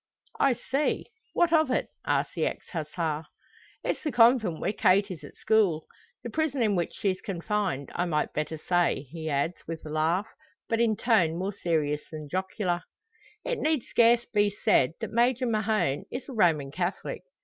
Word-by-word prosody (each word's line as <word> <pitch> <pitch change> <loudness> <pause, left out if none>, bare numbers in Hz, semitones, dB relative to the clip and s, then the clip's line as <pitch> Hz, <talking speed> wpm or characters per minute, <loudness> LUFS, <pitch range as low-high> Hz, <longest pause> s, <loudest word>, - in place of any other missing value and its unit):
"I 275 - +4
see 275 +5 -1 0.3
what 345 -1 +3
of 315 -3 +4
it!" 255 - 0 0.2
asks - - +1
the - - 0
ex - - -5
Hussar. 155 -1 -3 0.6
"It's - - -1
the 305 - -2
convent 230 -8 +4
where - - -1
Kate 200 +1 +3
is 160 -5 -8
at 145 - -11
school 195 -8 +2 0.4
the 240 - -4
prison 285 -2 0
in 210 -3 +2
which 175 -2 -1
she's 190 -2 -1
confined, 190 -6 -2
I 175 - 0
might 150 -3 -1
better 155 +1 -2
say," 175 -3 +1
he 160 -1 -5
adds, 145 +4 0
with 165 -1 -6
a - - -6
laugh, 160 +6 +1 0.4
but 230 -1 +1
in 225 -2 +3
tone 175 -9 +3
more 190 +3 -2
serious 155 -6 0
than 155 -2 -8
jocular. 185 0 -1 0.6
It - - -1
need 310 - +1
scarce 235 0 +4
be 205 -1 +2
said 160 -8 +2
that - - -4
Major 245 +2 +2
Mahon 215 - 0
is 255 - -6
a 270 - -7
Roman 160 - +2
Catholic. 180 +4 -3
190 Hz, 175 wpm, -28 LUFS, 160-230 Hz, 0.6 s, I